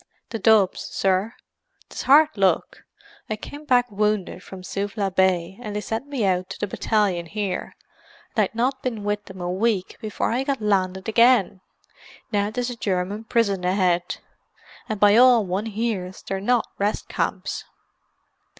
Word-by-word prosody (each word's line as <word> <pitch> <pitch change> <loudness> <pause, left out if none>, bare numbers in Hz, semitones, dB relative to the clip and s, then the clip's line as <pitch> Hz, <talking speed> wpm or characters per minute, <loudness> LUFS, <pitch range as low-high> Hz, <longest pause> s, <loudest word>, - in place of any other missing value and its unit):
"The 225 - -3
Dubs, 215 -3 +4
sir. 195 +4 0 0.5
'Tis - - -6
hard 295 +3 +6
luck; 195 -3 0 0.4
I 215 - -1
kem 290 +8 -10
back 250 -3 +4
wounded 210 -3 -1
from 190 -1 -10
Suvla 200 +1 -2
Bay 190 0 +1
and 210 -3 -6
they 210 - -1
sent 225 +6 -4
me 270 -7 -1
out 185 -1 0
to - - -7
the - - 0
battalion 195 -4 0
here; 200 -1 -3 0.6
and 215 - +4
I'd 210 - -11
not 260 +3 0
been 230 -5 -3
with 205 0 -2
them 190 -1 -11
a 175 0 -2
week 195 0 -1
before 215 0 -2
I 250 +3 0
got 275 -1 -1
landed 190 -2 0
again. 225 -4 +4 0.7
Now 205 -1 +1
'tis 245 +2 -2
a - - -6
German 200 +2 -2
prison 210 -6 +1
ahead—and 185 +3 -3
by 205 +1 +6
all 245 -3 +6
one 190 +4 -2
hears 210 -4 -3
they're 195 0 -3
not 240 +2 +2
rest 205 +1 -1
camps." - - -3
205 Hz, 160 wpm, -23 LUFS, 190-230 Hz, 0.7 s, hard